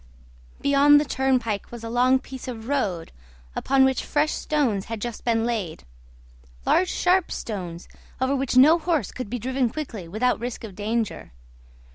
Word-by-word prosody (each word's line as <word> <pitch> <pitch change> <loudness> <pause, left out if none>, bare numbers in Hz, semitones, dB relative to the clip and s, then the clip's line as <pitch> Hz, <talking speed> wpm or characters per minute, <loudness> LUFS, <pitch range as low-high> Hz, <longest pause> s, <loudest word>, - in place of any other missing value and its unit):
Beyond 285 +1 +6
the 300 - 0
turnpike 255 -7 0
was 235 -1 -8
a 230 - -5
long 250 +2 +4
piece 260 -1 -9
of 230 -3 -6
road, 200 -12 -1 0.4
upon 270 0 +3
which 265 -1 +1
fresh 300 +1 +1
stones 250 -11 0
had 225 -1 -5
just 235 +1 -5
been 230 -1 +1
laid 210 -9 -3 0.8
large 365 0 +3
sharp 360 0 +2
stones, 180 -6 -5 0.3
over 260 +2 +1
which 265 -2 -1
no 310 +6 +7
horse 315 - 0
could 255 -5 -6
be 245 - -2
driven 255 +1 0
quickly 230 - -6
without 220 +8 0
risk 240 0 -5
of 215 -4 -7
danger. 215 - -3
250 Hz, 160 wpm, -24 LUFS, 220-275 Hz, 0.8 s, no